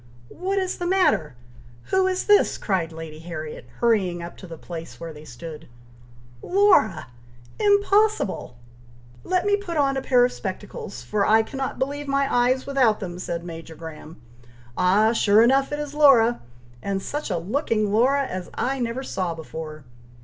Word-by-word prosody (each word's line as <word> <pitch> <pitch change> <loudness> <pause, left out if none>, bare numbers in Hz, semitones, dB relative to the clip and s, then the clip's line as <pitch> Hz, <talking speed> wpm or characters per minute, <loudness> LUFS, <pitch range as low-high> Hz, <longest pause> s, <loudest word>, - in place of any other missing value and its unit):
"What 385 +3 -3
is 375 -1 -1
the 350 - -2
matter! 355 - +2 0.6
Who 380 0 +3
is 370 0 0
this?" 415 -1 +4
cried 180 -5 -1
Lady 160 -1 -8
Harriet, 155 -5 -7 0.2
hurrying 190 -7 +1
up 170 - -8
to 185 - -11
the 165 -1 -9
place 165 0 -8
where 165 -1 -7
they 150 0 -12
stood. 155 +5 -9 0.7
"Laura!! 360 - +3 0.5
Impossible!!!" 405 - +2 0.7
"Let 365 0 0
me 405 0 +4
put 385 -5 -5
on 275 -2 +2
a - - -1
pair 250 -2 +4
of 250 - -1
spectacles, 200 -1 -7
for 210 -1 0
I 220 +2 +4
cannot 265 +3 -4
believe 285 +2 -3
my 275 0 +1
eyes 250 +2 +2
without 260 -6 +2
them!" 180 -3 -6
said 170 -2 -4
Major 165 -1 -9
Graham. 160 0 -10 0.6
"Ah! 210 +5 +3
sure 215 -1 +5
enough 270 +3 +3
it 295 - -2
is 295 -1 -5
Laura, 255 -6 +5 0.4
and 195 +4 -2
such 295 +10 -4
a - - 0
looking 215 - -1
Laura 270 +5 +3
as 185 -6 -6
I 270 +1 -1
never 240 +2 -2
saw 180 -9 -3
before. 155 -1 -8
225 Hz, 165 wpm, -24 LUFS, 170-285 Hz, 0.7 s, sure